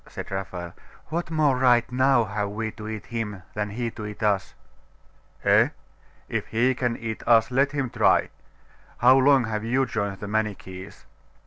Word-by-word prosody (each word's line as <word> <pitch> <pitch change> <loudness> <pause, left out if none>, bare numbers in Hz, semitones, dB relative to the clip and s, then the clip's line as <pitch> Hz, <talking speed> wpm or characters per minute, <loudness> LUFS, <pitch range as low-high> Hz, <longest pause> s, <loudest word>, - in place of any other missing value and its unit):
said - - -8
Raphael. 90 -3 -5 0.4
'What 170 +3 -3
more 155 -4 +2
right, 125 -1 +3
now, 130 -1 +3
have 105 -1 -3
we 110 +2 -3
to 110 -1 -9
eat 110 -1 -6
him 105 -5 -5
than 105 0 -2
he 115 +2 -3
to 110 -2 -7
eat 105 +1 -8
us?' 100 -2 0 0.9
'Eh? - - +5 0.6
If - - -3
he 125 +4 +2
can 125 -2 -1
eat 110 -1 -5
us, 115 0 +5
let 135 +2 +2
him 135 -4 -2
try. - - +3 0.7
How 125 +2 +6
long 135 -1 +5
have 110 -2 -3
you 130 +4 +1
joined 100 -5 -3
the 105 - -6
Manichees? 105 -3 -4
115 Hz, 170 wpm, -25 LUFS, 105-130 Hz, 0.9 s, How